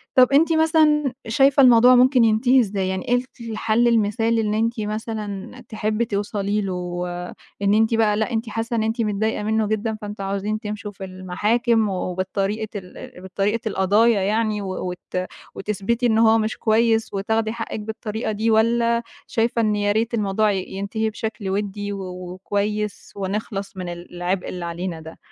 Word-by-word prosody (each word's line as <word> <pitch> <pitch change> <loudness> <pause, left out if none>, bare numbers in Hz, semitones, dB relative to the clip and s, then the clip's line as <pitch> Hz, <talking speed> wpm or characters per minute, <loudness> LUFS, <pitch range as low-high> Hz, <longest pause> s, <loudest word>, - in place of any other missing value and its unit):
طب 255 -1 +7
أنتِ 325 +4 +5
مثلًا 310 -3 +3
شايِفة 270 +4 +4
الموضوع 250 0 +7
ممكن 250 0 +5
ينتهِي 230 +4 +4
إزاي 200 -5 0
يعني؟ 190 0 -3
إيه 245 - +3
ال 245 - 0 0.3
الحل 220 +2 +2
المثالي 225 0 +2
إن 210 -1 -1
أنتِ 225 +2 0
مثلًا 210 -2 -4 0.2
تحبّي 215 +1 -1
توصلي 205 -1 -1
له؟ 180 -2 -3 0.6
إن 200 0 +3
أنتِ 220 +2 +3
بقى، 215 -2 +2
لأ، 220 +3 -1
أنتِ 225 0 -2
حاسَّة 230 +2 -3
إن 220 - +1
أنتِ 225 +2 -1
متضايِقة 215 0 -1
منه 220 0 +1
جدًا، 220 +1 -1
فأنتم 205 -1 -6
عاوزين 200 +2 -2
تمشوا 210 -1 -5
في 195 - -10
المحاكم 210 +5 0
وبالطريقة 195 +3 -2
ال 180 -2 -9
بطريقة 205 +5 -1
القضايا 205 +2 +3
يعني، 215 +1 0
و 190 -1 -4
وت 180 0 -4 0.3
وتثبَتِي 210 +4 -1
إن 220 -2 +3
هو 225 0 +5
مش 220 0 -1
كويِس 225 0 +2
وتاخُدي 220 +2 0
حقِّك 225 -1 -5
بالطريقة 220 +1 -4
دي، 220 +2 0
والّا 235 +1 +2 0.2
شايِفة 230 +1 +1
إن 215 -2 +2
يا 205 0 +1
ريت 225 +3 0
الموضوع 210 -1 +1
ي 190 -2 -1
ينتهِي 200 +3 -2
بشكل 215 -2 -5
ودِّي 205 +1 -2
و 200 - -5 0.3
وكويِس 205 +2 -3
ونخلَص 200 0 -4
من 180 -1 -4
العبء 175 +1 -4
اللي 180 -1 -5
علينا 170 0 -4
ده؟ 160 +1 -11
215 Hz, 165 wpm, -22 LUFS, 200-225 Hz, 0.6 s, طب